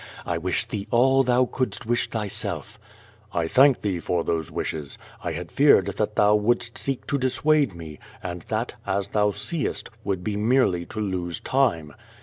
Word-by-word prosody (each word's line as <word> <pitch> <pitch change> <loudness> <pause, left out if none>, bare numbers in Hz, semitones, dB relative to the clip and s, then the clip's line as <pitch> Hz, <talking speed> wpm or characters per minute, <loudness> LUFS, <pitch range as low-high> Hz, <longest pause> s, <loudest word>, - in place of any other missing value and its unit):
I 85 -1 -1
wish 90 +2 -1
thee 100 -2 -5
all 130 +3 +4
thou 125 0 +3
couldst 125 -1 -3
wish 120 +1 0
thj^self/^ 105 -1 -3 0.5
"1 85 -1 0
thank 135 0 +5
thee 95 -4 -1
for 85 0 -1
those 80 -2 -1
wishes. 75 -3 -4 0.3
I 85 - -2
had 85 +1 -6
feared 140 -9 +5
that 105 0 -1
thou 105 0 +5
wouldst 115 +2 +1
seek 135 -2 -2
to 140 - -1
dissuade 135 - +2
me, 80 -3 -9 0.2
and 90 -1 -5
that, - - -2
as 100 0 -1
thou 105 0 +2
seest, 145 - -3
would 95 -3 -2
be 105 +1 -2
mei'ely 105 -6 +2
to - - -6
lose 90 -4 -2
time." 85 - 0
105 Hz, 170 wpm, -24 LUFS, 90-125 Hz, 0.5 s, thank